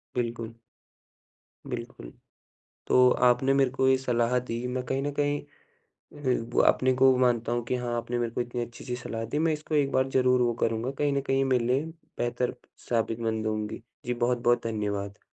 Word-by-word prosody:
बिल्कुल। 115 Hz, -2 st, -3 dB, 1.1 s
बिल्कुल। 115 Hz, -, -7 dB, 0.8 s
तो 125 Hz, 0 st, +6 dB, 0.2 s
आपने 125 Hz, +2 st, +3 dB
मेरे 135 Hz, -2 st, +3 dB
को 130 Hz, 0 st, +1 dB
ये 130 Hz, 0 st, +5 dB
सलाह 125 Hz, -1 st, +1 dB
दी, 120 Hz, -1 st, -4 dB
मैं 125 Hz, 0 st, -2 dB
कहीं 135 Hz, +2 st, -1 dB
न 145 Hz, -, -1 dB
कहीं 145 Hz, 0 st, +1 dB, 1.0 s
ब 120 Hz, -, +2 dB
अपने 130 Hz, 0 st, +3 dB
को 130 Hz, +1 st, +6 dB
वो 130 Hz, -, +2 dB
मानता 120 Hz, -2 st, +2 dB
हूँ 120 Hz, 0 st, 0 dB
कि 125 Hz, -, -1 dB
हाँ 120 Hz, -1 st, -2 dB
आपने 120 Hz, +1 st, -3 dB
मेरे 120 Hz, -1 st, -1 dB
को 125 Hz, -, -2 dB
इतनी 120 Hz, 0 st, -4 dB
अच्छी-सी 120 Hz, +1 st, -7 dB
सलाह 115 Hz, -2 st, -5 dB
दी, 140 Hz, +7 st, -2 dB
मैं 160 Hz, 0 st, +2 dB
इसको 155 Hz, +1 st, -4 dB
एक 140 Hz, -2 st, +2 dB
बार 130 Hz, 0 st, +2 dB
ज़रूर 125 Hz, -1 st, +3 dB
वो 120 Hz, -1 st, +2 dB
करूँगा 115 Hz, +3 st, 0 dB
कहीं 145 Hz, -1 st, +1 dB
न 140 Hz, -, +1 dB
कहीं 135 Hz, 0 st, +2 dB
मेरे 125 Hz, -3 st, +2 dB
लिए 130 Hz, +5 st, +1 dB, 0.3 s
बेहतर 120 Hz, +1 st, -1 dB, 0.3 s
साबितमंद 115 Hz, -1 st, -1 dB
होंगी। 110 Hz, +1 st, -3 dB, 0.2 s
जी, 125 Hz, -, 0 dB
बहुत-बहुत 120 Hz, 0 st, +1 dB
धन्यवाद। 100 Hz, -2 st, -3 dB
125 Hz, 180 wpm, -27 LUFS, 115-130 Hz, 1.1 s, तो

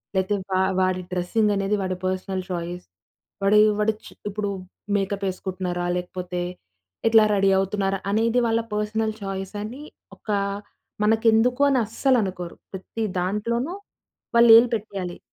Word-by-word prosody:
లేతే 190 Hz, +2 st, +1 dB, 0.2 s
వా 185 Hz, -, +2 dB, 0.2 s
వాడి 185 Hz, 0 st, +1 dB
డ్రెస్సింగ్ 205 Hz, +4 st, +1 dB
అనేది 195 Hz, +1 st, 0 dB
వాడి 185 Hz, -1 st, -2 dB
పర్సనల్ 185 Hz, 0 st, -2 dB
చాయిస్. 175 Hz, 0 st, -4 dB, 0.6 s
వాడేయే 210 Hz, +2 st, +6 dB
వాడొచ్చు 215 Hz, +1 st, -1 dB, 0.2 s
ఇప్పుడు 205 Hz, 0 st, -3 dB, 0.5 s
మేకప్ 200 Hz, 0 st, -1 dB
ఎసుకుంటున్నారా? 180 Hz, -1 st, -4 dB
లేకపోతే 180 Hz, 0 st, -4 dB, 0.7 s
ఎట్లా 225 Hz, -1 st, +7 dB
రెడీ 195 Hz, 0 st, +3 dB
అవుతున్నారా? 195 Hz, 0 st, -1 dB
అనేది 225 Hz, +3 st, +2 dB
వాళ్ళ 225 Hz, 0 st, +2 dB, 0.2 s
పర్సనల్ 215 Hz, +1 st, -1 dB
చాయిసని 205 Hz, +7 st, -5 dB, 0.3 s
ఒక -, -, -17 dB, 0.7 s
మనకెందుకో 225 Hz, +4 st, +3 dB
అని 265 Hz, -, +3 dB
అస్సలనుకోరు. 205 Hz, -7 st, 0 dB, 0.2 s
ప్రతి 190 Hz, +4 st, -5 dB, 0.2 s
దాంట్లోనూ 230 Hz, -, -1 dB, 0.6 s
వాళ్ళేలు 235 Hz, 0 st, +8 dB
పెట్టేయాలి. 195 Hz, -4 st, -5 dB
200 Hz, 115 wpm, -24 LUFS, 185-225 Hz, 0.7 s, వాళ్ళేలు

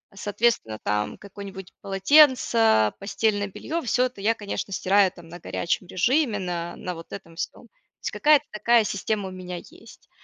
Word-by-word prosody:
Соответственно, 205 Hz, -, 0 dB
там 105 Hz, 0 st, -1 dB
какое-нибудь 195 Hz, -2 st, -9 dB
полотенце, 225 Hz, -, +4 dB
постельное 205 Hz, +1 st, 0 dB
белье- 320 Hz, -, -4 dB
всё 250 Hz, +2 st, +2 dB
это 245 Hz, -6 st, -6 dB
я, 225 Hz, +3 st, +3 dB
конечно, 205 Hz, -2 st, -5 dB
стираю 195 Hz, 0 st, +3 dB
там 175 Hz, -3 st, -15 dB
на 175 Hz, +1 st, -9 dB
горячем 175 Hz, +3 st, -2 dB
режиме, 235 Hz, -, +1 dB
на 175 Hz, -2 st, -4 dB
на 180 Hz, -, -5 dB
вот 165 Hz, -, -11 dB
этом 165 Hz, -4 st, -9 dB
всём. -, -, -6 dB
То -, -, -45 dB, 0.3 s
есть -, -, -2 dB
какая-то 300 Hz, -1 st, +4 dB
такая 230 Hz, +2 st, +3 dB
система 200 Hz, 0 st, -2 dB
у -, -, -10 dB
меня 180 Hz, -1 st, -7 dB
есть. 225 Hz, +6 st, -15 dB
200 Hz, 165 wpm, -25 LUFS, 180-225 Hz, 0.3 s, полотенце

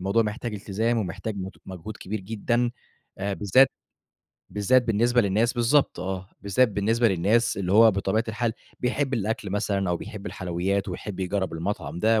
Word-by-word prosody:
الموضوع 100 Hz, +5 st, +2 dB
محتاج 110 Hz, +1 st, -4 dB
التزام 110 Hz, +4 st, -1 dB
ومحتاج 105 Hz, +2 st, -4 dB
مت 95 Hz, 0 st, -6 dB
مجهود 95 Hz, +3 st, -7 dB
كبير 105 Hz, +1 st, -5 dB
جدًا. 120 Hz, +4 st, 0 dB, 0.5 s
آآ 100 Hz, 0 st, -1 dB
بالذات 105 Hz, +8 st, +5 dB, 0.8 s
بالذات 115 Hz, +5 st, +3 dB
بالنسبة 120 Hz, +2 st, +3 dB
للناس 110 Hz, +3 st, +2 dB
بالضبط 120 Hz, -3 st, +2 dB
آه. 95 Hz, +1 st, -4 dB
بالذات 105 Hz, +5 st, +3 dB
بالنسبة 110 Hz, +4 st, +2 dB
للناس 105 Hz, +5 st, +2 dB
اللي 95 Hz, -2 st, -1 dB
هو 110 Hz, +2 st, +8 dB
بطبيعة 100 Hz, +3 st, 0 dB
الحال 110 Hz, +1 st, -1 dB, 0.3 s
بيحب 130 Hz, +2 st, 0 dB
الأكل 110 Hz, -2 st, -2 dB
مثلًا 100 Hz, -1 st, 0 dB
أو 85 Hz, -, +1 dB
بيحب 105 Hz, +2 st, -8 dB
الحلويات، 95 Hz, +2 st, -2 dB
ويحب 95 Hz, -3 st, -5 dB
يجرّب 95 Hz, -1 st, -1 dB
المطعم 85 Hz, -2 st, -3 dB
ده 110 Hz, +2 st, +3 dB
105 Hz, 155 wpm, -25 LUFS, 95-115 Hz, 0.8 s, هو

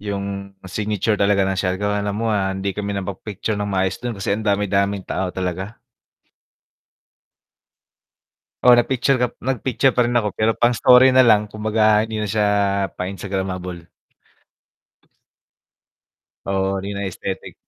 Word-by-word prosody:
yung 100 Hz, -1 st, -5 dB
signature 105 Hz, +2 st, -1 dB
talaga 100 Hz, -1 st, +3 dB
ng 95 Hz, 0 st, -1 dB
Siargao 100 Hz, +2 st, -1 dB
alam 100 Hz, 0 st, -2 dB
mo, 115 Hz, +1 st, -1 dB
ah, 95 Hz, -2 st, 0 dB
hindi 95 Hz, +1 st, -3 dB
kami 100 Hz, 0 st, -4 dB
napag-picture 100 Hz, +2 st, -4 dB
ng 105 Hz, 0 st, -2 dB
maayos 95 Hz, -1 st, -1 dB
dun 120 Hz, -3 st, -4 dB
kasi 95 Hz, 0 st, -2 dB
ang 110 Hz, +2 st, -3 dB
dami-daming 100 Hz, -1 st, 0 dB
tao 95 Hz, -1 st, -2 dB
talaga. 95 Hz, +4 st, -4 dB, 2.9 s
Oo, 125 Hz, -1 st, +7 dB
nag-picture 130 Hz, +2 st, +2 dB
kap 125 Hz, -1 st, 0 dB
nag 130 Hz, 0 st, -1 dB
picture 130 Hz, +1 st, +2 dB
pa 125 Hz, -, +4 dB
rin 120 Hz, -, -1 dB
ako 105 Hz, -, -2 dB
pero 110 Hz, +1 st, +2 dB
pang-story 125 Hz, +2 st, +5 dB
na 130 Hz, -, +7 dB
lang, 105 Hz, -2 st, +4 dB
kumbaga 110 Hz, 0 st, +2 dB
hindi 110 Hz, -1 st, -4 dB
na 105 Hz, -, -2 dB
siya 105 Hz, +1 st, +1 dB, 0.5 s
pang 90 Hz, -, -4 dB
instagramable. 95 Hz, -3 st, -5 dB, 2.6 s
Oo, 95 Hz, 0 st, -1 dB
hindi 100 Hz, +1 st, -5 dB
na 100 Hz, -, -3 dB
aesthetic. 95 Hz, 0 st, -6 dB
100 Hz, 140 wpm, -21 LUFS, 95-110 Hz, 2.9 s, Oo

